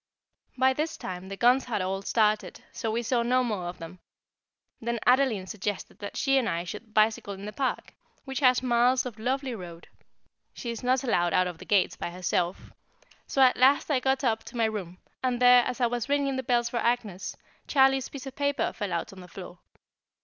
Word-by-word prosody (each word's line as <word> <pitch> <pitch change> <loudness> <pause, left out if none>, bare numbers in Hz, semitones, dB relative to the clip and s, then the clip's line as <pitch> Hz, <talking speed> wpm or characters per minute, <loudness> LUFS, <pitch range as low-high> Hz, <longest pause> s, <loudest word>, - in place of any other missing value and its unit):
By 260 +1 +4
this 305 +4 -3
time 185 +1 -7
the 195 - -6
guns 250 +4 +4
had 235 -4 -2
all 190 +1 -2
started, 215 +1 0
so 225 - -3
we 230 +2 -1
saw 240 +1 +1
no 250 +2 +2
more 210 -7 -2
of 175 - -6
them. 170 +2 -10 0.8
Then 235 0 -2
Adeline 250 -6 +3
suggested 205 +1 -5
that 205 - -7
she 270 -1 +3
and 240 - -1
I 170 +1 -1
should 215 +5 -9
bicycle 215 -2 +2
in 195 +1 -9
the 210 - -6
Park, 260 +4 -2 0.3
which 265 -1 -3
has 255 -2 +4
miles 250 +1 +3
of 235 -3 -7
lovely 260 +3 -1
road 175 -5 -9 0.7
(she 235 - -4
is 230 - -6
not 255 +1 +1
allowed 175 -9 +1
out 185 0 +4
of 175 -2 -6
the 185 - -10
gates 195 -2 +2
by - - -4
herself), 180 0 -2 0.6
so 270 - +3
at 255 - +5
last 270 +4 +4
I 270 - +3
got 265 +1 0
up 225 -3 +1
to 245 - -9
my 230 - +3
room, 195 -5 -4 0.3
and 250 -2 0
there, 250 0 +7
as 250 - -3
I 245 - +3
was 240 +1 -2
ringing 280 -1 +1
the 260 - -1
bell 240 -1 +1
for 235 0 -2
Agnès, 220 -6 -1 0.3
Charlie's 270 -1 +3
piece 280 -2 -8
of 270 - -8
paper 285 -3 0
fell 205 -3 -4
out 170 +3 -3
on 190 - -11
the 180 - -12
floor. 180 -1 -10
235 Hz, 210 wpm, -27 LUFS, 195-255 Hz, 0.8 s, there